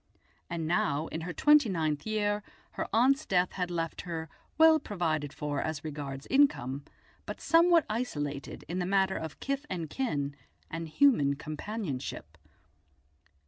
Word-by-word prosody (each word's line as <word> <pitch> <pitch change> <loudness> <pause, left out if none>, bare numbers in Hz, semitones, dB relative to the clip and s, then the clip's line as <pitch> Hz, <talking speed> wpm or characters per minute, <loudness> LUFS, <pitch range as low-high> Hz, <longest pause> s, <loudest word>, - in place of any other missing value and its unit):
And 170 -2 -3
now, 155 -2 +1
in 160 - -4
her 175 +2 -4
twenty 295 - +5
ninth 155 -2 -1
year, 210 -1 0 0.3
her - - -3
aunt's 270 +6 +4
death 180 -1 +2
had 180 -2 -2
left 165 -2 -3
her, 165 -2 -5 0.3
well 320 0 +7
provided 155 - -2
for 145 -1 -3
as 155 -2 -3
regards 145 -3 -5
income, 145 - +2 0.4
but - - -5
somewhat 335 -1 +5
isolated 145 - -4
in 175 +4 -3
the 180 - -1
matter 190 0 +2
of 160 - -5
kith 275 +1 -3
and 165 -5 -4
kin 145 - -2 0.4
and 165 0 -4
human 155 - +4
companionship. 155 - -5
170 Hz, 140 wpm, -30 LUFS, 150-220 Hz, 0.4 s, well